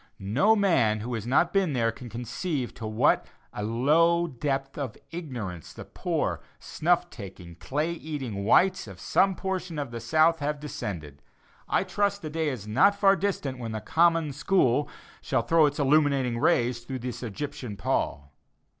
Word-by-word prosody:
No 120 - +3
man 135 - +2
who 120 +3 -4
has 115 -1 -4
not 165 +7 +2
been 190 -6 +2
there 115 -3 +1
can 120 +2 -10
conceive 125 - -3
to 110 - -6
what 110 0 +2 0.3
a - - -5
low 155 +10 +3
depth 135 -1 -3
of 135 -7 -5
ignorance 120 - -6
the - - -9
poor - - -2 0.2
snuff 175 +2 0
taking, 95 -5 -10
clay 150 - -2
eating 140 -11 -5
whites 185 - +3
of - - -11
some 195 -1 +2
portion 185 -4 -4
of 140 -4 -4
the 115 - -5
South 155 +7 +3
have 150 0 -2
descended. 80 - -6 0.5
I - - +2
trust 200 -1 -1
the 155 - -5
day 160 -1 0
is 115 -7 -6
not 200 - +4
far 195 -1 +5
distant 150 -11 -2
when 115 -2 -5
the 110 - -3
"common 165 +4 +2
school" 145 -2 +2 0.3
shall 115 - 0
throw 160 +4 +4
its 145 - -3
illuminating 140 -4 +2
rays 120 0 +2
through 125 +2 -6
this 125 -1 -6
Egyptian 120 -2 -5
pall. 70 -7 -2
135 Hz, 165 wpm, -27 LUFS, 115-165 Hz, 0.5 s, far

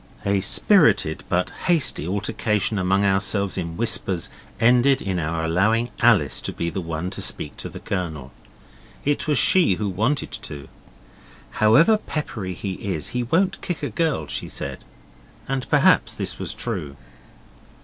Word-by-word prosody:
A 100 -1 +2
spirited 150 - +3
but 90 +1 0
hasty 160 - +1
altercation 105 +1 -1
among 95 +2 +2
ourselves 100 0 +1
in 85 -3 -4
whispers 95 -7 0 0.3
ended 125 +3 +4
in 95 -3 -2
our 80 +1 -2
allowing 110 +8 +1
Alice - - +3
to - - -3
be 85 0 -3
the 95 - -3
one 85 +2 -4
to - - -5
speak 75 - -5
to - - -5
the - - -9
Colonel. 80 -9 -4 0.7
It 145 +2 0
was 150 -3 +2
she 160 - +5
who 105 +1 -2
wanted 110 +10 -1
to. 70 -2 -8 0.8
'However 150 - +5
peppery 110 - -5
he 95 +1 -4 0.2
is 75 - -3
he 125 - -2
won't 185 +10 +1
kick 175 - -4
a - - -2
girl,' 165 -3 0
she - - -5
said, - - -5 0.6
and 135 -1 -3
perhaps - - +4
this - - -4
was - - -4
true. 70 -2 -4
100 Hz, 150 wpm, -23 LUFS, 90-130 Hz, 0.8 s, she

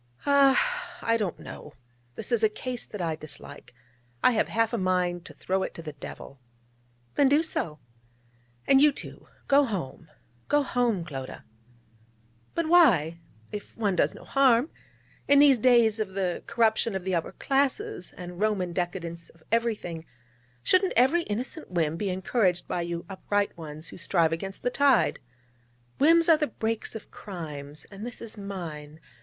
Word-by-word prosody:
'Ah!... 285 - +3
I 230 - +2
don't 210 -6 -1
know. 150 - -10 0.4
This 220 - -5
is 235 -2 +3
a 220 - +4
case 245 +3 -5
that 210 -4 -5
I 165 -2 -1
dislike. 155 -2 -10 0.5
I - - +6
have 225 - +1
half 225 +6 0
a - - +1
mind 180 -1 0
to - - -11
throw 190 +1 -1
it - - -4
to 165 - -8
the 155 -2 -7
devil.' 140 -1 -10 0.7
'Then 280 -2 +4
do 295 +3 +4
so.' 160 - -3 0.9
'And 270 0 +5
you, 300 0 +7
too - - -10 0.2
go 280 +1 +5
home, 175 - -5 0.4
go 290 0 +3
home, 235 -9 0
Clodagh!' 135 -5 -7 1.1
'But 335 -1 0
why? 200 - +5 0.3
if 210 - -8
one 205 -4 +1
does 155 -4 +2
no - - -12
harm. 270 0 +3 0.6
In 285 - +6
these 280 -3 +6
days 235 -2 +4
of 195 -3 -3
"the 185 -3 -1
corruption 225 -2 +2
of 190 - -3
the 190 0 -2
upper 165 -2 -1
classes," 270 -9 0
and 180 0 -8
Roman 200 -5 0
decadence 170 -1 -4
of 165 -1 -22
everything, 220 -8 -1 0.6
shouldn't 370 0 +3
every 265 +9 +4
innocent 250 - -4
whim 165 -3 0
be 200 +3 -2
encouraged 185 0 0
by 175 - -2
you 170 0 -4
upright 205 +1 -1
ones 155 -1 -8
who - - -11
strive 170 -1 +2
against 195 +4 -5
the 245 - +1
tide? 275 -2 +3 0.8
Whims 330 +3 +6
are 325 -2 +7
the 300 -1 0
brakes 225 0 -3
of 220 - -9
crimes: 150 -6 -8
and 200 +1 -9
this 240 0 -6
is 230 -1 -6
mine. 165 -7 -7
205 Hz, 165 wpm, -27 LUFS, 170-250 Hz, 1.1 s, you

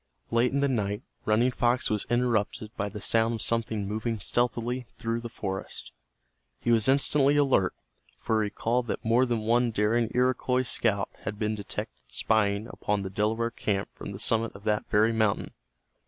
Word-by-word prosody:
Late 120 +1 +3
in 140 +1 0
the 140 - +3
night 105 -3 -1 0.2
Running 115 +4 +3
Fox 120 -1 +1
was 105 -1 -1
interrupted 115 -2 0
by 100 -1 -2
the 105 +1 -7
sound 115 +3 +2
of 110 - -3
something 110 -3 -1
moving 110 +2 -2
stealthily 120 +3 0
through 115 0 -2
the 120 - -6
forest. 95 -4 -5 0.7
He 120 - 0
was 115 -2 +3
instantly 140 +1 +4
alert, 135 -10 +3 0.4
for 110 -1 0
he - - +1
recalled 120 +4 -1
that - - -4
more 120 +3 +4
than 120 -2 0
one 120 +2 +2
daring 110 +1 +1
Iroquois 125 0 +2
scout 105 -4 0
had 105 - -5
been 105 0 -1
detected 105 -2 -5
spying 100 - +1
upon 105 -3 -2
the 95 - -5
Delaware 110 +4 0
camp 100 -3 -2
from - - -8
the 95 - -7
summit 115 +1 +1
of 100 - -12
that 105 -1 0
very 110 +2 +3
mountain. 110 -2 0
115 Hz, 175 wpm, -28 LUFS, 105-120 Hz, 0.7 s, instantly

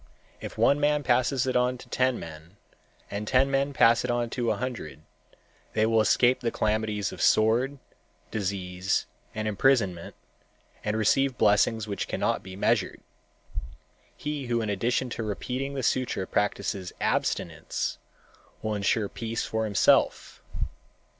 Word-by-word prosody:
If - - -8
one 140 - +4
man 150 0 +2
passes 130 0 +2
it 130 - -1
on 125 0 +2
to - - -13
ten 130 -1 +1
men 80 +4 -11 0.5
and 105 +1 -4
ten 135 +3 +3
men 140 +1 +1
pass 115 -3 +4
it 125 - -3
on 120 -1 0
to 120 -3 -1
a - - +2
hundred, 120 -12 -5 0.7
they 110 0 +3
will 110 0 +3
escape 120 +4 +4
the 120 - -1
calamities 110 -2 -1
of - - -8
sword, 120 +6 +3 0.5
disease 95 -2 -1 0.3
and 110 0 -2
imprisonment, 100 -5 +1 0.7
and 105 +1 -1
receive 130 +4 +2
blessings 110 +1 +3
which 100 -1 -3
cannot - - 0
be 95 0 -9
measured. 100 - 0 1.2
He 150 -3 -4
who 120 -1 +1
in 105 - -1
addition 120 +5 0
to 115 - -4
repeating 130 +6 -3
the 135 - -3
sutra 120 -8 0
practices 100 -2 -1
abstinence - - -1 0.6
will 110 - -1
insure 105 +1 +1
peace 115 +2 -4
for 110 0 -1
himself. 100 -2 +2
115 Hz, 140 wpm, -27 LUFS, 105-130 Hz, 1.2 s, one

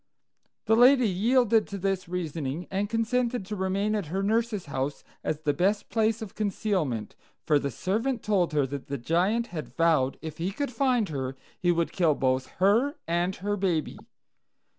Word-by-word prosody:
"The 225 - +4
lady 250 +1 +6
yielded 225 +3 +3
to 200 - -5
this 190 -2 -2
reasoning, 165 -3 -3
and 200 +1 -1
consented 230 0 0
to 210 - -4
remain 195 +2 0
at 205 -6 -2
her 190 +5 -2
nurse's 220 -1 0
house 140 0 -3 0.2
as 155 0 -2
the 150 -2 +1
best 200 +6 0
place 225 0 +1
of 205 - -9
concealment; 185 - -1 0.3
for 150 -2 +4
the 140 - -2
servant 220 - -1
told 195 -5 +1
her 145 -2 +2
that 140 +1 -6
the 140 - -3
Giant 185 - +1
had 155 -3 -4
vowed, 160 -6 +2
if 160 -1 -8
he 175 +3 -1
could 280 +6 -3
find 245 -4 +1
her, 135 -3 -3 0.2
he 175 - +3
would 170 -1 0
kill 165 -5 +2
both 130 -1 0
her 225 - +3
and 175 +2 0
her 205 +2 -2
baby. 180 -6 -1
190 Hz, 175 wpm, -27 LUFS, 155-220 Hz, 0.3 s, lady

